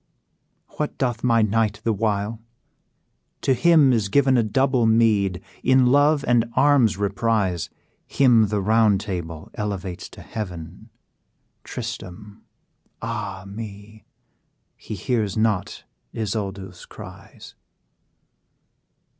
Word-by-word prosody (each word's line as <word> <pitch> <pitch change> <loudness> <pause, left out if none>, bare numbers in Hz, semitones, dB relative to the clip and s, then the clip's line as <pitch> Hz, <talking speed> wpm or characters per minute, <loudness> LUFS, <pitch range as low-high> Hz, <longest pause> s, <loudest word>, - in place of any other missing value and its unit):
"What 150 - -3
doth 120 -3 -2
my 115 -2 +3
knight 110 -1 0
the 115 - +1
while? 105 +1 -1 1.0
to 135 - +2
him 150 0 +5
is 110 -4 0
given 135 +3 +3
A 120 - +4
double 125 +2 +1
meed; 105 -5 +2 0.2
in 130 0 +4
love 145 +3 +3
and 120 -1 +2
arms' 130 -6 +4
emprise, 100 -3 0 0.4
Him 120 -5 +4
the 105 0 -1
Round 110 -1 +3
Table 85 -6 -6
elevates 100 -4 -5
to - - -13
heaven! 90 0 -7 0.7
Tristram! 100 +3 -8 0.6
ah 105 -5 -5
me! 105 +1 -10 0.7
he 110 - -8
hears 110 0 -1
not 110 -4 -1 0.3
Isoude's 100 -4 -5
cries." - - -12
110 Hz, 105 wpm, -23 LUFS, 100-120 Hz, 1.0 s, him